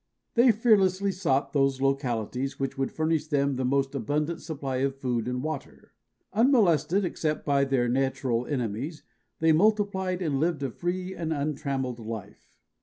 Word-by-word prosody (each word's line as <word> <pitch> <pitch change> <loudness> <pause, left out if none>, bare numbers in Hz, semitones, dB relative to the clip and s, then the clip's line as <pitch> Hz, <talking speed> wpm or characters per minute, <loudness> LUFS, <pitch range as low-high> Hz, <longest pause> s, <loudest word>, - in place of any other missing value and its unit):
They 240 +1 +6
fearlessly 200 -3 +3
sought 160 -7 0
those 135 -2 +2
localities 135 -1 -1
which 135 0 -2
would 135 -1 -2
furnish 160 -1 0
them 140 -2 +1
the 130 - -2
most 135 +1 +1
abundant 150 +6 -1
supply 140 -5 -4
of 135 +1 0
food 125 -4 -2
and 125 +1 -2
water. 155 -3 -6 0.4
Unmolested 205 - +3
except 155 -3 -2
by 140 -1 +3
their 135 -3 +1
natural 125 -1 0
enemies, 135 +4 -3 0.4
they 160 0 +4
multiplied 190 0 +2
and 145 -5 0
lived 160 -2 0
a 135 - -2
free 180 +5 -3
and 165 -3 -4
untrammeled 140 -4 -2
life. 110 -2 -8
140 Hz, 150 wpm, -27 LUFS, 135-175 Hz, 0.4 s, They